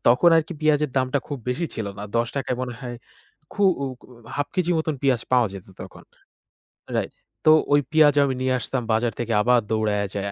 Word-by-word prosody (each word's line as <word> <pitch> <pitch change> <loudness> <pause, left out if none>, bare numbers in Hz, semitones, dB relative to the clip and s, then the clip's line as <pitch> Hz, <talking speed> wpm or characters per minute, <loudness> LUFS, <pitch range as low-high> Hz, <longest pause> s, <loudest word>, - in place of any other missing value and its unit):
তখন 125 +9 +6
আরকি 160 +1 0
পেঁয়াজের 150 -2 +2
দামটা 130 +2 +1
খুব 145 - -4
বেশি 155 +7 -1
ছিল 110 - -4
না। - - -6
৳১০ 125 +3 -1
য় - - -8
মনে 125 -1 -4
হয় 120 -2 -6 0.6
খু 205 - -2 0.2
উ - - 0 0.2
কু - - -18 0.3
১/২ 145 - -1
কেজি 180 -2 0
মত 160 0 -2
পেঁয়াজ 130 -4 +2
পাওয়া 125 -2 +5
যেত 95 -1 -9 0.2
তখন - - -12 0.9
রাইট। - - -2 0.3
তো 155 - +8 0.2
ওই 145 - +5
পেঁয়াজ 155 -2 +5
আমি 135 -2 0
নিয়ে 130 0 +1
আসতাম 125 +2 -3
বাজার 115 +1 +1
থেকে 120 -1 -1
আবার 125 +2 +4
দৌড়াইয়া 105 -2 0
যায়া। 100 0 -3
130 Hz, 200 wpm, -23 LUFS, 115-145 Hz, 0.9 s, তো